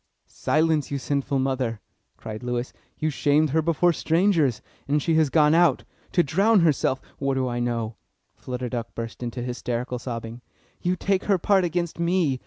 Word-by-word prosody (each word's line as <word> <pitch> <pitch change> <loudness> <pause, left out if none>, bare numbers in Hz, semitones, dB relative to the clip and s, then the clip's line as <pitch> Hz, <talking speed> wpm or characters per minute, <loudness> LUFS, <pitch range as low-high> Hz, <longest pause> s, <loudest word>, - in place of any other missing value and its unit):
"Silence, 155 -1 0
you 140 - -2
sinful 140 0 -1
mother!" 130 -4 -1 0.4
cried 110 -1 -7
Lewis. 125 0 -3 0.2
"You 155 0 -1
shamed 145 +1 +2
her 160 +2 +3
before 170 +2 +2
strangers, 165 - +2 0.3
and 145 +2 +2
she 165 +3 0
has 160 -2 +3
gone 150 +1 +4
out 170 -5 +4 0.3
to 175 - +4
drown 195 +8 +3
herself 145 -4 +2 0.2
what 135 -1 0
do 130 -1 0
I 120 -1 -2
know?" 115 -2 -2 0.4
Flutter 125 0 -5
Duck 115 -2 -5
burst 115 +1 -6
into 120 0 -4
hysterical 125 0 -3
sobbing. 115 -1 -6 0.4
"Yes, 180 +1 0
take 195 -1 +1
her 200 -2 +3
part 190 +1 +3
against 170 -1 -2
me! 170 -6 +1
140 Hz, 170 wpm, -25 LUFS, 125-165 Hz, 0.4 s, gone